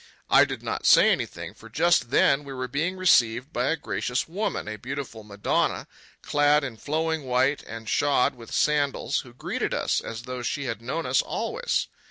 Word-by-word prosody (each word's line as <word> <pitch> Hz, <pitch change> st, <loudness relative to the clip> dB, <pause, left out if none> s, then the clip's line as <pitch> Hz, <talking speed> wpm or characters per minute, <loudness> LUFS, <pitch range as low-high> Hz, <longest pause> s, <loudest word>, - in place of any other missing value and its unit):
I -, -, +7 dB
did -, -, -6 dB
not -, -, -2 dB
say -, -, +7 dB
anything, -, -, -3 dB
for 115 Hz, -, -14 dB
just 165 Hz, +1 st, +2 dB
then 140 Hz, +2 st, +3 dB
we 140 Hz, -1 st, -8 dB
were 130 Hz, -1 st, -4 dB
being 160 Hz, +9 st, -2 dB
received 130 Hz, -8 st, +3 dB
by 125 Hz, +2 st, 0 dB
a 160 Hz, -, +2 dB
gracious 125 Hz, -2 st, -2 dB
woman, 195 Hz, -, -3 dB
a 110 Hz, -, -4 dB
beautiful 130 Hz, -1 st, -6 dB
Madonna, 100 Hz, -1 st, -1 dB, 0.4 s
clad 145 Hz, 0 st, +3 dB
in 125 Hz, -5 st, -5 dB
flowing 160 Hz, +4 st, -1 dB
white 130 Hz, +3 st, +1 dB
and 115 Hz, 0 st, -8 dB
shod 140 Hz, -1 st, +2 dB
with 115 Hz, -2 st, -13 dB
sandals, 145 Hz, -2 st, +1 dB
who 120 Hz, -, -10 dB
greeted 120 Hz, -, -3 dB
us -, -, 0 dB
as 115 Hz, 0 st, -6 dB
though 125 Hz, 0 st, -5 dB
she 140 Hz, +4 st, -2 dB
had 115 Hz, -4 st, -4 dB
known 160 Hz, +8 st, -3 dB
us -, -, +3 dB
always. -, -, -2 dB
130 Hz, 185 wpm, -26 LUFS, 120-150 Hz, 0.4 s, I